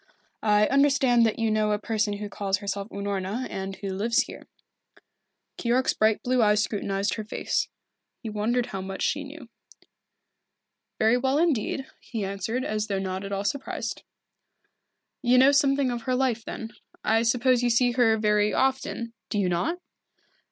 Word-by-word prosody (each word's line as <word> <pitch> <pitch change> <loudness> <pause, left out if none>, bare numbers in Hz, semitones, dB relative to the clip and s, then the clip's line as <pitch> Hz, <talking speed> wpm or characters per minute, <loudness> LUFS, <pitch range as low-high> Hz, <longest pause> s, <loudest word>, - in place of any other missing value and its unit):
I 210 -1 +4
understand 270 -3 +4
that 220 - -2
you 225 -1 +1
know 215 -1 +2
a - - +1
person 215 0 -1
who 205 +1 -5
calls 195 -1 -1
herself 200 +1 -4
Unorna, 200 +4 -3
and 195 0 -4
who 195 - -6
lives 210 +5 +1
here." - - -11 1.1
Keyork's 250 +2 +2
bright 215 0 +2
blue 250 0 +2
eyes 210 -1 +4
scrutinized 200 -1 -1
her 215 - -4
face. 210 - -1 0.6
He - - -5
wondered 220 +3 0
how 195 -4 -5
much 190 0 -5
she 290 +1 0
knew. 285 -2 -10 1.5
"Very 220 +3 +4
well 265 +2 +1
indeed," 280 -4 0
he 220 -5 -4
answered, 200 +6 -3
as 215 0 -2
though 200 -2 -1
not 190 0 -3
at 200 - -6
all 200 0 -2
surprised. 280 +5 -3 1.2
"You 250 0 +4
know 265 +2 +7
something 275 -2 +3
of 240 -1 -3
her 255 +1 -1
life, 250 -3 0
then. 225 0 -6 0.3
I 225 +1 +3
suppose 245 +2 +3
you 245 - +2
see 245 +1 +3
her 235 -2 +3
very 210 -1 +2
often, 260 -3 -1 0.2
do - - -2
you 195 -3 +1
not?" 180 - 0
225 Hz, 165 wpm, -26 LUFS, 205-250 Hz, 1.5 s, know